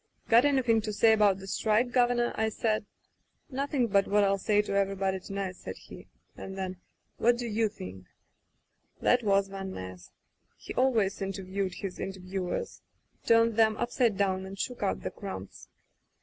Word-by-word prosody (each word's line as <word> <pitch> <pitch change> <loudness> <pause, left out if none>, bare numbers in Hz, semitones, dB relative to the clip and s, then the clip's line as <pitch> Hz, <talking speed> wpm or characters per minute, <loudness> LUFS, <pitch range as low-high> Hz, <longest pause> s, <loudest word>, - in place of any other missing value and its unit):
'Got 235 +3 +6
anydiing 250 -6 +3
to 215 - -3
say 220 +2 +5
about 205 -3 +4
the 195 - -10
strike. 220 +5 +1
Governor?* 245 -1 +2
I 220 0 +1
said. 215 -1 -1 0.6
'Nothing 275 -1 0
but 200 -3 +2
what 205 0 +3
ril 195 0 +2
say 210 +1 +2
to 205 - -4
everybody 195 -1 0
to 185 - -11
night,' 190 -2 -3
said - - -7
he, - - -13 0.3
and 190 0 -8
then: 185 -1 -4 0.4
'What 240 +1 +3
do 240 - -4
you 220 -1 +1
think 95 - -10 0.5
?* - - -44
"That 245 - +4
was 200 -2 +2
Van 195 -1 -6
Ness. 95 -1 -8 0.5
He - - -8
always 225 -8 +1
inter 195 0 -3
viewed 190 0 -3
his 195 -2 -6
interviewers. 185 -1 -4 0.5
Turned 230 -1 +4
them 220 -1 +4
up 240 - -2
side 235 -6 +2
down 190 -2 +1
and 195 +1 -8
shook 250 +5 -4
out 200 - 0
the - - -3
crumbs. 100 - -8
200 Hz, 180 wpm, -29 LUFS, 190-230 Hz, 0.6 s, Got